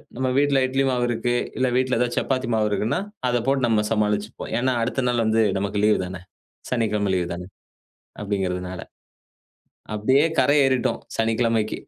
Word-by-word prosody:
நம்ப 130 +2 -1
வீட்ல 140 -1 +3
இட்லி 135 +1 0
மாவு 125 -1 +1
இருக்கு 120 +1 -1 0.2
இல்ல, 130 - +2
வீட்ல 130 -1 +1
ஏதாவது 120 0 0
சப்பாத்தி 130 -2 -1
மாவு 110 -1 +2
இருக்குனா, 105 +2 0 0.3
அத 120 0 +2
போட்டு 135 -2 +2
நம்ப 110 -2 +2
சமாளிச்சுப்போம். 105 0 -1
ஏன்னா, 130 +2 +1
அடுத்த 125 +3 -1
நாள் 120 -1 +1
வந்து 110 +1 +3 0.2
நமக்கு 100 +1 -2
லீவ் 105 0 +4
தான? 90 0 -7 0.5
சனிக்கிழமை 105 -4 0
லீவ் 90 -2 0
தான? 90 +1 -6 0.8
அப்டீங்குறதுனால. 95 -3 -3 1.1
அப்டியே 130 +8 +3
கரை 145 - +4
ஏறிட்டோம் 130 -2 +1 0.2
சனிக்கிழமைக்கு. 115 -1 +1
115 Hz, 150 wpm, -23 LUFS, 105-130 Hz, 1.1 s, லீவ்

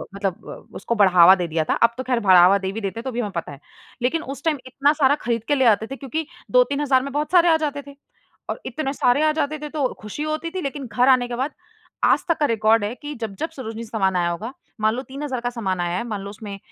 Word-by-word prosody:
मतलब 195 -3 -4
अ, - - -12
उसको 235 +4 -2
बढ़ावा 185 -3 +7
दे 180 -2 -3
दिया 160 0 0
था। - - +4
अब 235 - +4
तो 260 - -3
ख़ैर 250 -2 0
बढ़ावा 190 -2 +6
दे 190 0 -3
भी 220 +2 -5
देते 200 +3 -4
हैं, - - -7
तो 260 - -4
भी 240 - -4
हमें 210 -4 -2
पता 170 -3 -4
है। 140 - -11 0.4
लेकिन 290 +7 0
उस 275 +1 -8
टाइम 315 -3 +1
इतना 280 +3 +2
सारा 285 -2 +3
खरीद 230 -2 -1
के 290 - +2
ले 265 -2 +2
आते 220 0 +3
थे 270 - -6
क्योंकि 290 +4 -4 0.2
2-3,000 285 - +3
में 280 - -5
बहुत 300 +3 -2
सारे 350 -1 +5
आ 320 - +5
जाते 290 -2 -3
थे। 280 - -11 0.6
और - - -4
इतने 270 +2 -3
सारे 250 +1 +2
आ 310 - +4
जाते 305 0 -2
थे 300 - -4
तो 285 -4 -1
खुशी 210 +8 -6
होती 310 +2 -3
थी, 370 +2 -4
लेकिन 275 -1 -4
घर 250 +4 +3
आने 255 -2 +4
के 240 - -4
बाद 265 +4 -2 0.5
आज - - +3
तक 335 - +2
का 295 - +4
रिकॉर्ड 220 -2 +2
है 210 - -3
कि 295 +3 -8
जब-जब 225 +9 -4
सरोजिनी 230 -6 -7
से - - -13
सामान 190 -5 0
आया 175 -1 +1
होगा, 215 +9 -5 0.3
मान 215 +1 +2
लो 255 - -4
3,000 270 -2 -5
का 245 - -2
सामान 195 -7 -3
आया 175 0 -1
है, - - -3
मान 210 -4 -4
लो 200 - -7
उसमें 205 -1 -8
245 Hz, 270 wpm, -22 LUFS, 205-285 Hz, 0.6 s, बढ़ावा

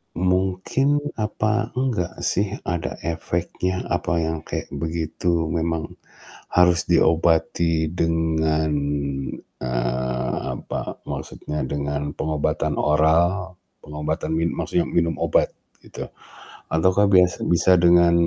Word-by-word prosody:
mungkin 95 - +1 0.2
apa 110 +2 0
enggak 125 -9 -1
sih, 100 +1 +1 0.2
ada 85 -2 -2
efeknya, 85 +2 -2
apa - - 0
yang 80 0 -2
kayak - - -3
begitu 80 +2 -1
memang 80 -1 -1 0.7
harus 90 -1 +5
diobati 80 0 +3
dengan, 80 -2 +1 0.9
eee, 65 0 -1 0.2
apa, - - -5
maksudnya 75 0 -4
dengan 70 +1 -2
pengobatan 75 -2 -1
oral, 85 +5 +2 0.3
pengobatan 75 +2 -3
min 85 +1 +1
maksudnya 90 - 0
minum 85 -1 +1
obat - - +3 0.3
gitu, - - -8 0.6
ataukah 95 +5 +3
biasa 90 -2 +4
bisa 85 +2 +4
dengan 85 0 +5
85 Hz, 100 wpm, -23 LUFS, 80-90 Hz, 0.9 s, harus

